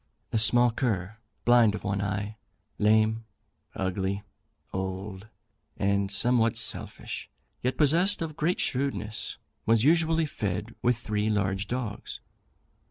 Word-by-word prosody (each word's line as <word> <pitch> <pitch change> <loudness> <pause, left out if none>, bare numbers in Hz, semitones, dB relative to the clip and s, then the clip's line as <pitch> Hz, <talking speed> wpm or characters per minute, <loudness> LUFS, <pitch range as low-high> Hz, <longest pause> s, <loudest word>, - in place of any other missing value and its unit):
A 110 - +3
small 120 +3 +6
cur, 110 -4 -2 0.3
blind 120 -3 +5
of - - -7
one 100 0 -1
eye, 100 +2 -3 0.4
lame, 110 +1 +3 0.5
ugly, 95 +1 -2 0.5
old, 95 +2 -4 0.5
and 100 0 +1
somewhat 115 +2 +2
selfish, 115 -1 -2 0.3
yet 125 +1 -1
possessed 170 +7 +3
of 160 -2 -4
great 165 +3 0
shrewdness, 125 -5 -2 0.3
was 115 0 +4
usually 165 +1 +3
fed 105 -4 -3
with 120 -1 +2
three 105 -2 -1
large 100 -1 0
dogs. 120 -4 -4
110 Hz, 115 wpm, -28 LUFS, 100-125 Hz, 0.5 s, small